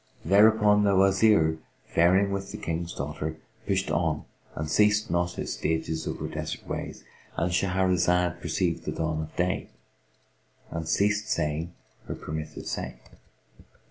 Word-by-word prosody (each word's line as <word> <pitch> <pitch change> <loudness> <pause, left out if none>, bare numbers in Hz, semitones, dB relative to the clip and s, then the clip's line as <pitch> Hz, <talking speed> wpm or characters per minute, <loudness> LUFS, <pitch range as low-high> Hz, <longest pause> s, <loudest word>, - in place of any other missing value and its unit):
Thereupon 105 +2 +5
the 100 -1 +3
Wazir, 95 -4 +4 0.3
faring 95 +4 +3
with 100 0 -3
the 105 - -6
King's 85 -1 -3
daughter, 75 +3 -4 0.3
pushed 95 -1 0
on 80 -3 0 0.3
and 75 - -3
ceased 105 +5 +3
not 85 0 +1
his - - -4
stages 80 0 -2
over - - -3
desert - - -5
ways,—And 85 +1 -5
Shahrazad 90 -1 +2
perceived 85 0 -1
the - - -2
dawn 80 -1 -1
of 80 - -8
day 90 +1 -1 1.0
and 80 -1 -4
ceased 105 +3 +1
saying 80 -2 -1 0.3
her - - -4
permitted 75 0 -6
say. - - -4
90 Hz, 130 wpm, -27 LUFS, 80-100 Hz, 1.0 s, Thereupon